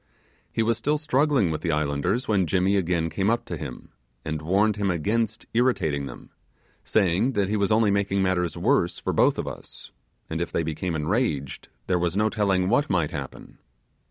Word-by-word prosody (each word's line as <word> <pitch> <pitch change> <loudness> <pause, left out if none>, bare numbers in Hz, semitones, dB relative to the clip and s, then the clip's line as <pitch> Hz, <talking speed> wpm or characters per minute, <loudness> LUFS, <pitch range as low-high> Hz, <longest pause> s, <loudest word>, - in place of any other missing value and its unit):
He 115 - 0
was 115 0 +1
still 150 +6 +1
struggling 140 - +2
with 75 - -3
the 85 - -1
islanders 75 - 0
when 95 -5 +2
Jimmy 95 +3 +2
again 85 -3 +1
came 95 +5 0
up 120 +1 0
to - - -5
him, - - -8 0.4
and 75 -1 -3
warned 100 +6 +2
him 100 -1 0
against 110 +6 -1
irritating 80 - +1
them, 60 - -11 0.5
saying 100 +5 +2
that 100 -4 0
he 105 - 0
was 100 0 +1
only 110 -1 +4
making 100 -1 +1
matters 90 -3 0
worse - - +1
for - - -3
both - - +3
of - - -3
us, - - -8 0.4
and 80 +1 -3
if 85 - -3
they 85 - 0
became 80 +2 -3
enraged, 75 - -1 0.2
there 90 - +1
was 85 +2 -1
no 105 +1 +3
telling 95 -4 +1
what 125 +8 +2
might 85 -5 +1
happen. - - -8
95 Hz, 185 wpm, -25 LUFS, 85-110 Hz, 0.5 s, only